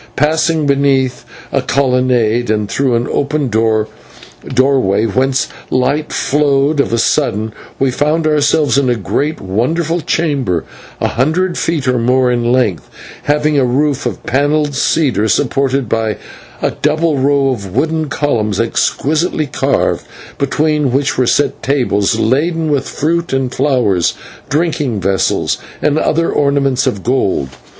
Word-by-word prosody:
Passing 155 Hz, +2 st, +1 dB
beneath 135 Hz, -2 st, +1 dB, 0.3 s
a -, -, +1 dB
colonnade 125 Hz, -4 st, +1 dB
and 105 Hz, -1 st, 0 dB
through 130 Hz, +2 st, 0 dB
an 115 Hz, +1 st, 0 dB
open 145 Hz, -1 st, -1 dB
doorway 110 Hz, +2 st, -1 dB
whence 130 Hz, +4 st, 0 dB, 0.2 s
light 140 Hz, +4 st, 0 dB
flowed, 145 Hz, 0 st, +1 dB
of 140 Hz, -, +1 dB
a 115 Hz, -, +1 dB
sudden 110 Hz, -4 st, 0 dB, 0.2 s
we 135 Hz, -1 st, +1 dB
found 150 Hz, +5 st, 0 dB
ourselves 150 Hz, -1 st, +2 dB
in 135 Hz, -2 st, +1 dB
a 120 Hz, -, +2 dB
great 145 Hz, -, -2 dB
and 95 Hz, -, -10 dB
wonderful 160 Hz, -, 0 dB
chamber, 140 Hz, -, -1 dB, 0.4 s
a -, -, +1 dB
hundred 165 Hz, +8 st, 0 dB
feet 160 Hz, -5 st, -1 dB
or 125 Hz, -1 st, +2 dB
more 125 Hz, +1 st, +2 dB
in 120 Hz, -1 st, 0 dB
length, 110 Hz, -, 0 dB, 0.4 s
having 150 Hz, 0 st, +2 dB
a -, -, +3 dB
roof 140 Hz, +3 st, 0 dB
of -, -, -6 dB
panelled 145 Hz, +2 st, +1 dB
cedar, 135 Hz, -6 st, +1 dB
supported 135 Hz, +2 st, 0 dB
by 110 Hz, 0 st, -1 dB, 0.5 s
a -, -, +1 dB
double 155 Hz, -1 st, 0 dB
row 140 Hz, 0 st, +2 dB
of 115 Hz, -7 st, -3 dB
wooden 160 Hz, -1 st, 0 dB
columns 110 Hz, -10 st, -1 dB
exquisitely 155 Hz, +7 st, 0 dB
carved, 135 Hz, -, 0 dB, 0.4 s
between 150 Hz, 0 st, +1 dB
which 135 Hz, +2 st, 0 dB
were 125 Hz, -1 st, +1 dB
set 140 Hz, +1 st, +1 dB
tables 125 Hz, -8 st, +1 dB
laden 155 Hz, +6 st, 0 dB
with 140 Hz, -2 st, -1 dB
fruit 170 Hz, +3 st, -1 dB
and 135 Hz, -1 st, -1 dB
flowers, 125 Hz, -, +1 dB, 0.3 s
drinking 150 Hz, -7 st, 0 dB
vessels, 95 Hz, 0 st, 0 dB, 0.2 s
and 150 Hz, +1 st, +1 dB
other 165 Hz, +2 st, +1 dB
ornaments 140 Hz, -2 st, +1 dB
of 100 Hz, -, -2 dB
gold. 115 Hz, -, 0 dB
135 Hz, 140 wpm, -14 LUFS, 120-150 Hz, 0.5 s, a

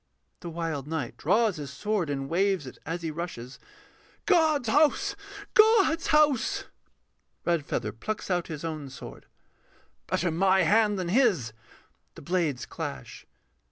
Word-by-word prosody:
THE 175 Hz, -, -7 dB
WILD 165 Hz, -4 st, -4 dB
KNIGHT 155 Hz, -6 st, -3 dB
[draws 210 Hz, +3 st, +2 dB
his 145 Hz, -2 st, -6 dB
sword, 190 Hz, +4 st, -2 dB
and 135 Hz, -1 st, -3 dB
waves 185 Hz, 0 st, +1 dB
it 130 Hz, -, -10 dB
as 170 Hz, +1 st, -4 dB
he 160 Hz, -, -2 dB
rushes]. 150 Hz, -7 st, -7 dB, 0.7 s
God's 315 Hz, -, +3 dB
house! 310 Hz, -, +3 dB, 0.4 s
God's 430 Hz, -7 st, +5 dB
house! 305 Hz, -, +3 dB, 0.8 s
REDFEATHER 150 Hz, -10 st, -1 dB
[plucks 195 Hz, -, -5 dB
out 175 Hz, -1 st, 0 dB
his 155 Hz, 0 st, -6 dB
own 155 Hz, -4 st, -5 dB
sword]. 130 Hz, -, -11 dB, 0.8 s
Better 175 Hz, 0 st, 0 dB
my 190 Hz, +3 st, +3 dB
hand 210 Hz, -1 st, +3 dB
than 180 Hz, -2 st, -3 dB
his. 190 Hz, -, +2 dB, 0.6 s
[_The -, -, -12 dB
blades 165 Hz, -8 st, 0 dB
clash. 65 Hz, -2 st, -7 dB
175 Hz, 130 wpm, -27 LUFS, 150-225 Hz, 0.8 s, God's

